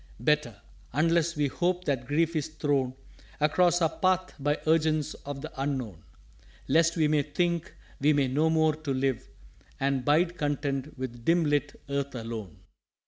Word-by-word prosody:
_" - - -25 0.2
"Better 150 -7 +1 0.3
unless 165 +3 +2
we 150 -1 +1
hope 180 +5 0
that 130 -4 -1
grief 165 +3 +1
is 155 -1 0
thrown 145 -5 -1 0.4
Across 175 +3 +3
our 160 - +4
Path 185 0 +1
by 145 +2 +1
urgence 155 -1 +2
of 140 -1 -5
the 155 - -6
Unknown, 130 - -3 0.7
Lest 165 +1 +3
we 155 -2 +3
may 150 -1 +3
think 170 +3 -1 0.2
we 140 - +1
have 135 -2 +1
no 155 +4 +2
more 160 -1 +3
to 155 -3 -4
live 130 -2 -1 0.5
And 135 -1 0
bide 170 +5 +2
content 145 -1 -2
with 120 -2 -6
dim 170 +3 +3
lit 145 -1 0
Earth 140 -1 -2
alone." 115 -7 -6
150 Hz, 160 wpm, -28 LUFS, 135-160 Hz, 0.7 s, our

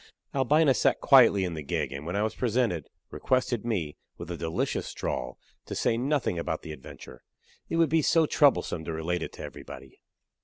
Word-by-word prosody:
Albina 140 +2 +3
sat - - +2
quietly 120 -8 +6
in 90 -2 -2
the 80 - -5
gig, 75 -2 -2
and 70 +3 -7
when 85 - -3
I 105 - +1
was 110 - -1
presented, 115 - -1 0.2
requested 125 -3 0
me, 95 -11 -2 0.2
with 85 0 -7
a - - -3
delicious 80 -1 -2
drawl, - - -4 0.3
to - - -5
say - - +1
nothing 130 - 0
about 80 -1 -3
the 80 - -7
adventure 65 - -12 0.5
it - - -2
would 165 -2 +3
be 160 +2 +3
so 160 +2 +3
troublesome 140 - +2
to 80 - -4
relate 80 +2 -2
it - - -5
to - - -9
everybody! 65 0 -10
100 Hz, 190 wpm, -27 LUFS, 80-130 Hz, 0.5 s, quietly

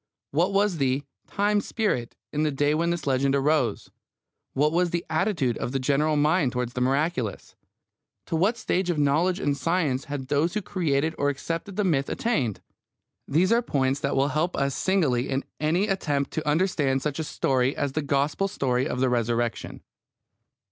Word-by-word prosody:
What 170 +7 +2
was 200 -2 +2
the 135 0 0 0.2
"time 205 +1 +1
spirit" 200 - -2 0.2
in 150 - 0
the 155 - +2
day 145 +1 +1
when 165 +2 +1
this 170 -1 -2
legend 135 0 +2
arose? 140 -2 +1 0.6
What 150 +3 +2
was 175 +2 +2
the 170 0 -2
attitude 160 - 0
of 125 - -3
the 135 - 0
general 145 +4 +1
mind 150 -2 +2
towards 125 -1 -2
the 125 - -3
miraculous? 135 - -1 0.7
To - - -3
what 195 +8 +2
stage 185 -5 -1
of 175 - 0
knowledge 155 +6 +2
and 145 -6 0
science 145 -2 0
had 145 -3 -5
those 155 +6 +1
who 210 - -1
created 160 -4 0
or 145 - +2
accepted 165 +7 -4
the 210 - +1
myth 145 -7 +1
attained? 185 - -1 0.7
These 170 +8 +2
are 235 +1 +4
points 135 - 0
that 140 -1 -1
will 135 +1 +2
help 155 +5 0
us 140 0 0
signally 145 -11 +1
in 135 0 -1 0.2
any 170 +7 +1
attempt 150 -8 -1
to 155 -1 -2
understand 150 -5 +1
such 150 0 -2
a - - -1
story 130 -3 0
as 145 -2 -1
the 155 - -1
Gospel 145 +6 0
story 130 -6 0
of 125 - -3
the 130 - +3
Resurrection. 120 -1 -1
150 Hz, 180 wpm, -26 LUFS, 135-175 Hz, 0.7 s, are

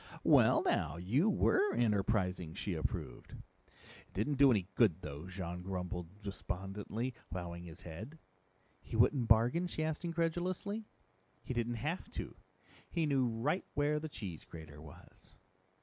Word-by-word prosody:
"Well, - - +6
now. - - +1
You 120 - +2
were 390 - +3
enterprising!" 95 -6 +1
she 100 - -2
approved. 80 -2 -4
"It - - -17
didn't 130 +8 0
do 140 -1 +8
any 100 -7 +3
good 95 -7 +3
though," 75 +2 -6
Jean 90 -1 -5
grumbled 90 +1 -5
despondently, 100 +5 -4 0.2
bowing 85 0 -5
his 85 0 -10
head. 105 - -8 0.6
"He - - -7
wouldn't 125 -6 +4
bargain?" 120 +11 +4
she 160 -2 -2
asked 155 +1 -2
incredulously. 175 +5 -1 0.6
"He - - -3
didn't 120 0 0
have 165 +5 -2
to. - - -5 0.5
He 170 -2 +1
knew 135 -4 +3
right 120 +11 0
where 150 +1 +2
the 155 +1 -5
cheese 95 - -6
grater 75 -3 -10
was." 80 -3 -15
110 Hz, 140 wpm, -35 LUFS, 90-150 Hz, 0.6 s, do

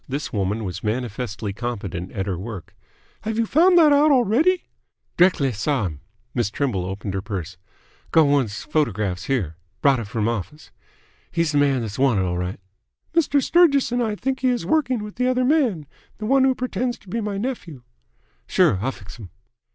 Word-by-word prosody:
This 140 +1 -4
woman 105 +2 -1
was 90 -3 -5
manifestly 110 -2 -3
competent 100 -6 -5
at 95 -3 -2
her 95 -2 -2
work. 100 -4 -8 0.5
"Have 220 0 -3
you 230 - +2
found 350 - +4
that 310 -3 +7
out 295 +2 +5
already?" 280 - +3 0.5
"D'rectly 170 -7 +3
saw 115 +2 -1
him." 75 -5 -5 0.3
Miss 120 -5 0
Trimble 110 -7 -1
opened 95 0 -5
her 95 - -2
purse. 95 -3 -5 0.5
"Go' 160 - +5
one 140 -2 +3
'f - - -8
his 105 - -6
photographs 105 - -1
here. 95 - -1 0.2
Brought 140 -3 +3
it 115 - -5
from 105 +1 -1
office. 120 - -5 0.6
He's 165 -2 0
th' 145 - +1
man 140 -3 +3
that's 110 -1 -5
wanted 125 -8 +3
'll 90 -1 -1
right." 90 +2 -3 0.5
"Mr. 290 -4 +2
Sturgis 305 -8 +4
and 245 0 +1
I 220 -3 0
both - - -19
think 265 0 -1
he 260 - +1
is 245 -1 -1
working 265 -8 +1
with 210 +1 -9
the 250 +1 +1
other 255 0 +2
man, 250 - +2 0.3
the 215 - -5
one 265 +3 +4
who 260 -1 +3
pretends 250 -1 -2
to - - -24
be 230 +6 -2
my 205 -2 -3
nephew." 195 - -5 0.6
"Sure. 95 - +3
I'll 130 +4 0
fix 100 +5 -12
'm." 100 -5 -9
140 Hz, 195 wpm, -22 LUFS, -, 0.6 s, that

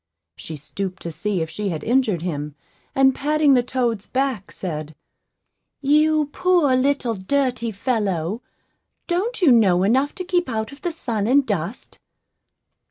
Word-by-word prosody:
She 160 - -8
stooped 185 +5 -6
to 170 - -4
see 195 +2 -2
if 160 - -6
she 205 +3 -3
had 160 -4 -4
injured 225 -8 +1
him, 150 -4 -4 0.4
and 270 0 +5
patting 295 +1 +2
the 250 - +5
toad's 240 -4 -2
back, 260 -7 -2
said, 155 -4 -5 0.8
"You 305 +2 +3
poor 350 -8 +3
little 255 -2 +1
dirty 235 +3 -1
fellow, 205 -3 -1 0.6
don't 390 +5 -1
you 300 - +7
know 190 -6 +4
enough 260 +8 +2
to 370 - -4
keep 355 -4 0
out 220 +1 -2
of 280 - -13
the 350 - -2
sun 230 -10 -2
and 275 +3 +4
dust?" 200 0 -4
240 Hz, 150 wpm, -22 LUFS, 190-280 Hz, 0.8 s, you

